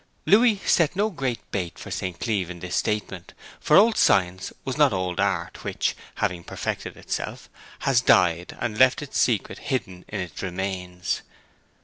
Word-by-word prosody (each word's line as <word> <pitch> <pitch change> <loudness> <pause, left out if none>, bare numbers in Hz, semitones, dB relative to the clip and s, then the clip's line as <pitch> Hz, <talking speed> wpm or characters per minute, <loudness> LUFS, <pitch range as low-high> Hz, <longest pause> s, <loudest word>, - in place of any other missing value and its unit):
Louis 220 0 +5
set 170 0 +3
no 210 +3 +1
great 135 - -2
bait 90 -4 -3
for - - -9
St. 90 -2 -4
Cleeve 100 -6 -1
in 90 -1 -7
this 90 +1 -4
statement, 95 -4 -2 0.2
for 150 - +4
old 220 +2 +5
science 95 -1 +2
was 130 -1 -2
not 150 -5 +4
old 90 -1 -2
art 90 -4 -1
which, - - -1 0.2
having 90 -2 -1
perfected - - -4
itself, - - -5 0.3
has 135 -3 +3
died 90 -6 +3
and 105 -2 -3
left 130 +3 +5
its 145 - -3
secret 115 -5 +1
hidden 95 -9 -2
in 105 - -5
its 90 -3 -5
remains. 90 -2 -3
95 Hz, 160 wpm, -25 LUFS, 90-130 Hz, 0.3 s, Louis